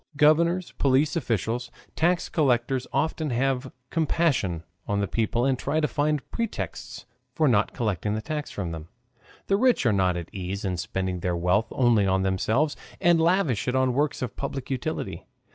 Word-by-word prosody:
Governors, 170 Hz, +4 st, +3 dB
police 140 Hz, +3 st, +3 dB
officials, 120 Hz, -, -1 dB, 0.3 s
tax 175 Hz, +2 st, +2 dB
collectors 130 Hz, -3 st, +1 dB
often 155 Hz, +2 st, 0 dB
have 130 Hz, +1 st, 0 dB, 0.2 s
compassion 150 Hz, -, +1 dB, 0.2 s
on 100 Hz, 0 st, 0 dB
the 100 Hz, -, 0 dB
people 115 Hz, +3 st, 0 dB
and 135 Hz, -2 st, +1 dB
try 155 Hz, -, 0 dB
to 150 Hz, -, +2 dB
find 150 Hz, -1 st, 0 dB
pretexts 155 Hz, -, -4 dB, 0.3 s
for 155 Hz, -, +3 dB
not 110 Hz, -5 st, +3 dB
collecting 105 Hz, -3 st, -1 dB
the 110 Hz, -, -2 dB
tax 150 Hz, -1 st, -4 dB
from 90 Hz, -5 st, -4 dB
them. 80 Hz, -1 st, -7 dB, 0.6 s
The 195 Hz, -, +2 dB
rich 250 Hz, -, +3 dB
are 115 Hz, -, +4 dB
not 95 Hz, -2 st, +2 dB
at 85 Hz, 0 st, -7 dB
ease 95 Hz, +1 st, -4 dB
in 90 Hz, -2 st, -1 dB
spending 95 Hz, +1 st, -2 dB
their 90 Hz, 0 st, -1 dB
wealth 90 Hz, +6 st, +2 dB
only 115 Hz, -6 st, +3 dB
on 95 Hz, 0 st, +2 dB
themselves, 110 Hz, +10 st, +1 dB, 0.2 s
and 175 Hz, -3 st, +4 dB
lavish 165 Hz, -, +2 dB
it 125 Hz, -, 0 dB
on 130 Hz, -1 st, +2 dB
works 145 Hz, 0 st, 0 dB
of 125 Hz, -, -4 dB
public 135 Hz, -1 st, -5 dB
utility. 130 Hz, -, -3 dB
125 Hz, 170 wpm, -26 LUFS, 100-150 Hz, 0.6 s, are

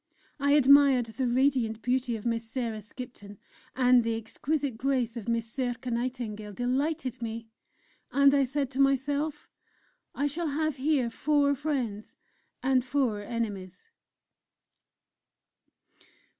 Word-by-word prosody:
I 285 Hz, 0 st, +3 dB
admired 280 Hz, -3 st, +6 dB
the 230 Hz, +3 st, -3 dB
radiant 245 Hz, -3 st, +1 dB
beauty 250 Hz, -1 st, 0 dB
of 220 Hz, -, -8 dB
Miss 230 Hz, -1 st, 0 dB
Sarah 230 Hz, -4 st, -3 dB
Skipton, 210 Hz, -2 st, -10 dB, 0.4 s
and 250 Hz, -1 st, +5 dB
the 230 Hz, 0 st, -1 dB
exquisite 260 Hz, +5 st, -2 dB
grace 250 Hz, -1 st, 0 dB
of 235 Hz, -3 st, -7 dB
Miss 230 Hz, -1 st, -2 dB
Circé 245 Hz, -1 st, -2 dB
Nightingale 230 Hz, -4 st, -4 dB
delighted 255 Hz, +2 st, -1 dB
me; 225 Hz, 0 st, -5 dB, 0.6 s
and 280 Hz, +2 st, +5 dB
I 280 Hz, -1 st, +4 dB
said 270 Hz, 0 st, -2 dB
to 265 Hz, -, -5 dB
myself: 280 Hz, +2 st, +1 dB, 0.7 s
"I 285 Hz, -, 0 dB
shall 320 Hz, +4 st, -1 dB
have 310 Hz, 0 st, -1 dB
here 265 Hz, -3 st, +1 dB
four 285 Hz, +2 st, +2 dB
Friends 260 Hz, -8 st, -3 dB, 0.5 s
and 260 Hz, -1 st, +3 dB
four 250 Hz, -5 st, 0 dB
Enemies!" 205 Hz, -, -5 dB
255 Hz, 120 wpm, -28 LUFS, 230-280 Hz, 0.7 s, admired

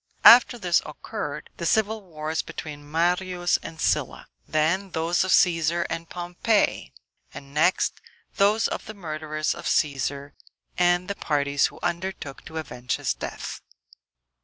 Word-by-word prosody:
After 245 Hz, +1 st, +9 dB
this 175 Hz, -6 st, +2 dB
occurred -, -, -6 dB
the -, -, -4 dB
civil 220 Hz, 0 st, +1 dB
wars 160 Hz, -3 st, -3 dB
between 145 Hz, -1 st, -8 dB
Marius 175 Hz, +2 st, +1 dB
and 160 Hz, -, -9 dB
Sylla; -, -, 0 dB, 0.2 s
then 165 Hz, +6 st, +1 dB
those 165 Hz, +2 st, +1 dB
of 185 Hz, -, -3 dB
Cæsar, 170 Hz, -2 st, +3 dB
and 165 Hz, 0 st, -4 dB
Pompey; 180 Hz, +5 st, 0 dB, 0.4 s
and 140 Hz, 0 st, -10 dB
next 160 Hz, +5 st, +2 dB, 0.4 s
those 210 Hz, +2 st, +4 dB
of -, -, -5 dB
the 220 Hz, -, -7 dB
murderers 155 Hz, -4 st, -3 dB
of -, -, -7 dB
Cæsar, 140 Hz, 0 st, 0 dB, 0.4 s
and 175 Hz, 0 st, +2 dB
the 200 Hz, -, -2 dB
parties 145 Hz, -6 st, +1 dB
who -, -, -13 dB
undertook 175 Hz, -5 st, -4 dB
to 160 Hz, -, -8 dB
avenge 130 Hz, -5 st, -3 dB
his -, -, -1 dB
death. -, -, -6 dB
170 Hz, 135 wpm, -25 LUFS, 155-185 Hz, 0.4 s, After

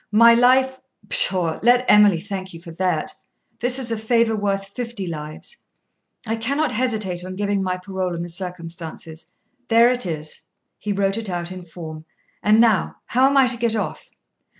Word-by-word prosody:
My 230 Hz, +2 st, +7 dB
life 260 Hz, +2 st, +3 dB, 0.3 s
pshaw 185 Hz, -, +2 dB
let 245 Hz, +2 st, +4 dB
Emily 205 Hz, -4 st, +6 dB
thank 190 Hz, -1 st, -6 dB
you -, -, -9 dB
for 170 Hz, 0 st, -11 dB
that; 175 Hz, -2 st, -1 dB, 0.5 s
this 245 Hz, +2 st, +3 dB
is 250 Hz, -3 st, -2 dB
a 225 Hz, -, -1 dB
favour 230 Hz, 0 st, +2 dB
worth 200 Hz, -1 st, -2 dB
fifty 230 Hz, -2 st, -5 dB
lives. 155 Hz, -, -7 dB, 0.7 s
I 225 Hz, 0 st, -2 dB
cannot 280 Hz, +5 st, -1 dB
hesitate 215 Hz, -7 st, -2 dB
on 185 Hz, 0 st, -7 dB
giving 200 Hz, 0 st, -1 dB
my 185 Hz, -1 st, -1 dB
parole 185 Hz, -1 st, -4 dB
in 170 Hz, -, -4 dB
the 175 Hz, -, -6 dB
circumstances; 170 Hz, -2 st, -7 dB, 0.4 s
there 230 Hz, +1 st, +5 dB
it 250 Hz, -6 st, -1 dB
is 155 Hz, -2 st, -5 dB, 0.4 s
(he 210 Hz, -, -3 dB
wrote 195 Hz, 0 st, 0 dB
it 220 Hz, -3 st, -3 dB
out 175 Hz, 0 st, -4 dB
in 185 Hz, -1 st, -8 dB
form). 160 Hz, -2 st, -9 dB, 0.4 s
And 215 Hz, +1 st, +4 dB
now, 220 Hz, -6 st, +3 dB
how 255 Hz, +3 st, +3 dB
am 275 Hz, 0 st, +2 dB
I 270 Hz, -, +6 dB
to 240 Hz, -1 st, +1 dB
get 230 Hz, -1 st, 0 dB
off?' 210 Hz, -4 st, -4 dB
200 Hz, 175 wpm, -21 LUFS, 175-235 Hz, 0.7 s, My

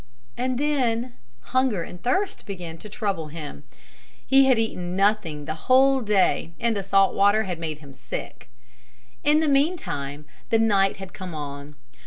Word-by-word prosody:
And 255 Hz, 0 st, -1 dB
then 255 Hz, -4 st, 0 dB, 0.4 s
hunger 255 Hz, -9 st, +2 dB
and 180 Hz, +1 st, -10 dB
thirst 375 Hz, +11 st, -1 dB
began 175 Hz, -5 st, -7 dB
to 210 Hz, -, -10 dB
trouble 195 Hz, -7 st, -2 dB
him. 150 Hz, -, -8 dB, 0.6 s
He 270 Hz, +1 st, +6 dB
had 260 Hz, -3 st, +4 dB
eaten 180 Hz, -5 st, -2 dB
nothing 195 Hz, -7 st, +1 dB
the 155 Hz, -, -3 dB, 0.2 s
whole 265 Hz, +1 st, +5 dB
day 200 Hz, -5 st, +1 dB
and 230 Hz, -1 st, +1 dB
the 200 Hz, -, -1 dB
salt 195 Hz, 0 st, +3 dB
water 205 Hz, +2 st, +4 dB
had 180 Hz, -5 st, -4 dB
made 160 Hz, -2 st, -4 dB
him 140 Hz, -2 st, -12 dB
sick. 60 Hz, -, -7 dB, 0.7 s
In 300 Hz, +2 st, +4 dB
the 315 Hz, -, +1 dB
meantime 275 Hz, -, 0 dB, 0.2 s
the 225 Hz, -, +4 dB
night 200 Hz, -3 st, +3 dB
had 190 Hz, -2 st, -9 dB
come 185 Hz, -3 st, -7 dB
on. 145 Hz, 0 st, -7 dB
200 Hz, 160 wpm, -24 LUFS, 165-250 Hz, 0.7 s, He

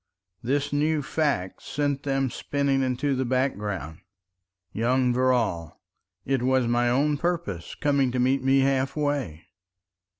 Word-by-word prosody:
This 140 Hz, +4 st, -1 dB
new 150 Hz, +1 st, +1 dB
fact 140 Hz, -, -1 dB
sent 145 Hz, -1 st, -2 dB
them 135 Hz, -2 st, -1 dB
spinning 140 Hz, 0 st, 0 dB
into 130 Hz, +2 st, 0 dB
the 130 Hz, -, 0 dB
background. 105 Hz, -, -2 dB, 0.7 s
Young 125 Hz, +2 st, +1 dB
Verrall! 120 Hz, -11 st, 0 dB, 0.5 s
It 135 Hz, -2 st, 0 dB
was 130 Hz, 0 st, +2 dB
my 120 Hz, +1 st, +2 dB
own 145 Hz, +4 st, +2 dB
purpose 165 Hz, -, -3 dB
coming 140 Hz, -3 st, +1 dB
to 125 Hz, -, -2 dB
meet 130 Hz, +2 st, +2 dB
me 135 Hz, +1 st, +4 dB
half 135 Hz, 0 st, +1 dB
way. 145 Hz, -, -2 dB
130 Hz, 130 wpm, -25 LUFS, 120-140 Hz, 0.7 s, me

